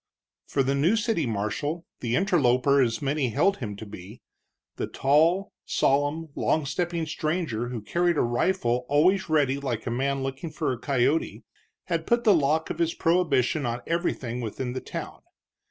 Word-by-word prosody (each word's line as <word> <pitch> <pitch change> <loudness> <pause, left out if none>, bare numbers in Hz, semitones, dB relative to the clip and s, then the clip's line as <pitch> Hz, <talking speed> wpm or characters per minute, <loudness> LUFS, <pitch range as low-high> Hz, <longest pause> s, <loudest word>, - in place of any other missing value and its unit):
For 135 - +1
the 135 +1 +1
new 155 +10 +3
city 220 - 0
marshal, 115 +10 -2
the 120 -1 -1
interloper 140 -7 +3
as 120 +3 0
many 140 -2 0
held 170 - +2
him 105 -5 -5
to 110 - -8
be, 105 +2 -11 0.5
the - - -2
tall, 165 +8 +2
solemn, 145 +4 +1
long 155 +1 0
stepping 170 +2 -2
stranger 155 -7 -2
who 120 -3 -5
carried 175 +6 +1
a - - +3
rifle 125 -1 0
always 180 +6 +3
ready 140 -3 +2
like 125 -5 -3
a 120 - -2
man 135 +2 -1
looking 135 +5 -4
for 155 -3 -2
a 120 - -7
coyote, 135 +4 0 0.4
had - - -2
put 235 0 +2
the 210 - +6
lock 155 0 +1
of - - -6
his 165 -1 +1
prohibition 155 -5 +2
on 120 +1 -3
everything 130 -8 -2
within 125 +2 -4
the 130 - -4
town. - - -7
140 Hz, 170 wpm, -26 LUFS, 125-165 Hz, 0.5 s, the